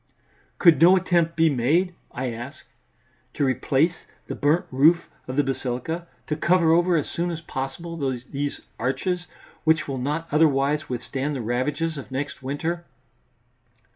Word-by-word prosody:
"Could 165 -5 +5
no 180 +3 +8
attempt 170 -3 +1
be 165 0 +4
made," 155 +7 +2 0.2
I 125 0 -3
ask, 130 +7 -8 0.7
"to 145 - +1
replace 135 +5 +2 0.3
the - - -5
burnt 150 +5 +2
roof 155 +6 +4 0.2
of 130 - -4
the 145 - +3
basilica, 135 +6 -3 0.2
to 150 - -2
cover 170 +1 +3
over 175 +1 +4
as 150 - 0
soon 175 +1 -2
as 165 -2 -3
possible 160 +3 -5
these 140 +1 -3 0.2
arches, 175 +7 -1 0.4
which 160 -1 +2
will 135 -2 -3
not 150 +6 -2
otherwise 150 -1 +2
withstand 135 +3 -3
the 130 - -3
ravages 140 +7 -1
of 135 - -9
next 140 +2 -4
winter?" 160 +6 -3
150 Hz, 145 wpm, -24 LUFS, 135-165 Hz, 0.7 s, no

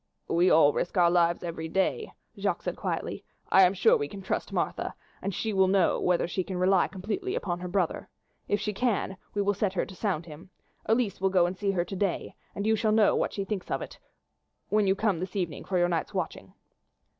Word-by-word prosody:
"We 175 +2 +3
all 150 -2 +6
risk 175 - -2
our 170 -1 +5
lives 170 -1 +2
every 165 -2 -4
day," 190 - 0 0.2
Jacques - - -2
said - - -2
quietly. - - -3 0.3
"I 190 - +7
am 185 +1 +5
sure 185 - +5
we 145 - -1
can 195 +4 -9
trust 190 - -2
Martha, - - -2 0.3
and 200 - -2
she 215 +3 -2
will 190 -1 +4
know 190 -2 +3
whether 180 -2 +2
she 185 +2 -2
can 185 0 -5
rely 185 0 +3
completely 225 - -4
upon 175 -3 -2
her 180 - -5
brother. 180 -2 -1 0.4
If 205 - +1
she 210 +1 -2
can, 205 -4 -1 0.2
we 205 - +1
will 200 +1 +2
set 200 -1 -1
her 190 - 0
to 190 - -11
sound 180 -5 -2
him. 165 +3 -12 0.4
Elise 220 -4 +1
will 190 - +3
go 185 -2 +4
and 180 +2 -2
see 200 +1 -2
her 180 -3 +1
to 195 - -6
day, 190 -2 -2 0.2
and 200 - -3
you 220 0 +3
shall 215 0 +1
know 215 -1 +4
what - - 0
she 195 - -3
thinks 195 -3 -4
of - - -1
it - - -11 0.7
when 210 -1 +2
you 190 - +3
come 195 -4 0
this 185 +2 -5
evening 175 -7 -3
for 185 - -1
your 175 0 +3
night's 170 -2 -2
watching." - - -4
190 Hz, 225 wpm, -28 LUFS, 175-205 Hz, 0.7 s, I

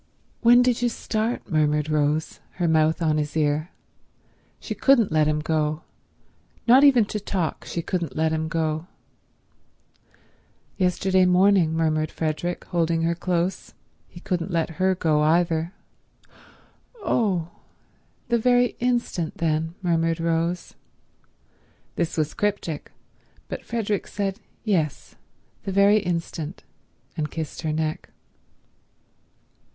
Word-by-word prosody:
"When 240 +1 +6
did 245 -1 +1
you 240 - +2
start?" 225 +1 -2
murmured 150 -3 +1
Rose, 155 0 0
her 175 -2 -1
mouth 160 +1 +2
on 155 -1 +2
his 150 +1 -3
ear. 150 +2 +1 0.9
She - - -5
couldn't 255 -8 +3
let 155 -1 +3
him 150 0 +1
go; 155 0 -1 0.8
not 255 +4 +7
even 260 -6 +6
to 210 - -4
talk 185 -5 -3
she 170 - -4
couldn't 175 -2 -3
let 160 0 +1
him 160 0 -1
go. 160 0 -2 1.9
"Yesterday 185 0 +2
morning," 180 -2 +4
murmured 155 -1 +1
Frederick, 165 +2 -3
holding 165 -2 0
her 170 +1 +2
close. 175 +1 -2 0.3
He 175 - -13
couldn't 175 0 -2
let 170 -2 -1
her 190 0 +3
go 155 -4 +1
either. 165 +1 +2 1.2
"Oh—the 220 - -3
very 245 +1 +3
instant 240 -9 -1
then," 160 0 -1
murmured 165 -1 +1
Rose. 165 +1 -1 1.2
This 170 -1 -2
was 155 -1 0
cryptic, 200 -7 -2 0.6
but - - -6
Frederick 215 -4 -2
said, 200 0 -3 0.2
"Yes, 170 -9 -1 0.5
the 195 - -4
very 200 +2 +5
instant," 170 -3 -4 0.5
and 155 -3 -2
kissed 160 -2 -5
her 160 -2 -1
neck. 155 0 -2
170 Hz, 115 wpm, -24 LUFS, 155-195 Hz, 1.9 s, not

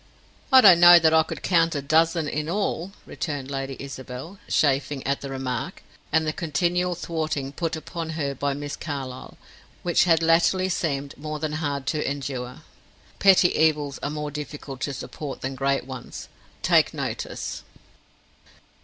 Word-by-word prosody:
"I 260 -1 +9
don't 185 -6 +8
know 175 0 +10
that 160 -1 +4
I 160 - +6
could 160 - -6
count 165 -3 +2
a 145 - -1
dozen 160 +2 +2
in 150 +2 -3
all," 195 -1 -2
returned 140 -4 -5
Lady 135 -1 -4
Isabel, 135 +6 -8
chafing 140 -1 +1
at 140 +1 -1
the 140 - -6
remark, 130 -3 -4 0.3
and 160 +1 +2
the 155 - -1
continual 175 +3 0
thwarting 155 -5 -3
put 165 +2 -3
upon 165 +1 -6
her 140 -3 -1
by 140 +1 -2
Miss 145 0 -5
Carlyle, 135 -4 -6 0.5
which 175 0 +3
had 165 -2 +3
latterly 170 +3 +3
seemed 140 -5 -2
more 155 +1 -4
than 155 0 -3
hard 145 -3 -3
to 150 0 -1
endure. 130 -3 -5 0.6
Petty 190 -2 +5
evils 150 -3 +1
are - - -2
more 150 0 -4
difficult 145 -2 -7
to 145 - -2
support 145 +1 -7
than 135 +1 -3
great 135 +1 0
ones, 130 -2 -8 0.3
take - - +3
notice. - - -4
150 Hz, 155 wpm, -24 LUFS, 140-165 Hz, 0.6 s, know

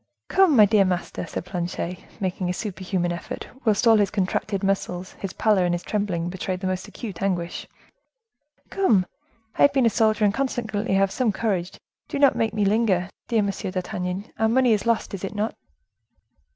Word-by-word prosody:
"Come! 375 -5 +5
my 215 -3 +8
dear 205 -1 +4
master," 180 -2 -2
said 165 - -5
Planchet, 180 0 -4 0.2
making 185 -2 -2
a - - 0
super 190 -2 -5
human 180 -2 0
effort, 170 - -6 0.2
whilst 215 0 +2
all 225 -1 +7
his 205 -2 +3
contracted 195 0 -1
muscles, 185 -2 -1
his 195 - -4
pallor 210 -4 +3
and 175 0 +1
his 175 - -5
trembling 195 -5 -1
betrayed 185 +1 -3
the 190 - -5
most 185 0 -2
acute 205 -7 -8
anguish. 175 -3 -2 1.0
"Come! 220 - +3 0.5
I - - +2
have 285 - +6
been 265 -3 +3
a 230 - +4
soldier 215 -1 +2
and 200 - +3
consequently 225 -6 -1
have 195 0 +3
some 245 -1 +1
courage; 190 -4 -2 0.3
do - - -4
not 280 -1 +5
make 225 - +1
me 210 -1 +2
linger, 195 -3 +2 0.2
dear 225 -3 +2
Monsieur 200 0 -3
d'Artagnan; 185 +1 -3
our 220 0 +3
money 250 0 +4
is 210 +2 -1
lost, 230 -3 0
is 195 - -5
it 195 +2 -4
not?" 210 +2 -1
200 Hz, 190 wpm, -24 LUFS, 185-220 Hz, 1.0 s, my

